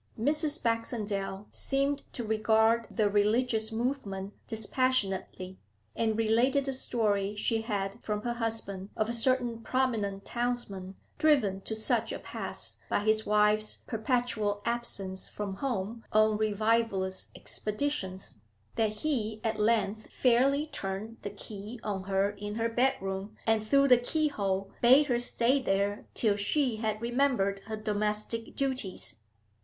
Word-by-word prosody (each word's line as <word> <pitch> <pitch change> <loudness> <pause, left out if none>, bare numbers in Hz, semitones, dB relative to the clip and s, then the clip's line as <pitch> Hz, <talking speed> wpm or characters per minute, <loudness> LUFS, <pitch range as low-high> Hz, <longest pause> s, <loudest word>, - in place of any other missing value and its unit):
Mrs. 300 +5 +2
Baxendale 210 -4 -2
seemed 275 +1 -1
to 240 - -3
regard 220 +1 +3
the 215 -3 +1
religious 220 +2 +2
movement 220 -5 -3
dispassionately, 205 -5 0 0.4
and 220 -1 +1
related 240 +5 +3
a 270 - 0
story 210 -5 0
she 225 +2 0
had 200 -3 -3
from 210 -1 -2
her 240 - -1
husband 220 -4 -4
of 215 +1 +1
a - - -1
certain 240 -1 +1
prominent 225 -6 -1
townsman 235 -6 -3 0.2
driven 230 -12 +3
to 220 - -4
such 220 - +1
a - - -3
pass - - -5
by - - +1
his 215 +1 +1
wife's 210 0 +3
perpetual 220 -3 -1
absence 205 -5 -3
from 200 -2 -5
home 230 -2 -3
on 215 0 +4
revivalist 215 -2 +1
expeditions, 210 - -3 0.4
that 220 -1 +2
he 220 -2 -1
at 220 -1 -1
length 215 -1 +1
fairly 270 +4 +3
turned 215 -4 -5
the 205 - -4
key 205 +3 -8
on 195 -3 -3
her 195 +1 +1
in 205 0 -6
her 230 0 0
bedroom, 210 -4 -1
and 225 -1 +3
through 275 +5 +4
the 250 -2 +7
keyhole 205 -9 -1
bade 260 +5 +7
her 245 -4 +1
stay 245 +2 +2
there 200 -2 0
till 215 -3 +2
she 235 +4 +1
had 215 -1 -1
remembered 235 -5 +1
her 220 -1 -4
domestic 215 +2 -2
duties. 260 - -2
220 Hz, 135 wpm, -30 LUFS, 205-245 Hz, 0.4 s, the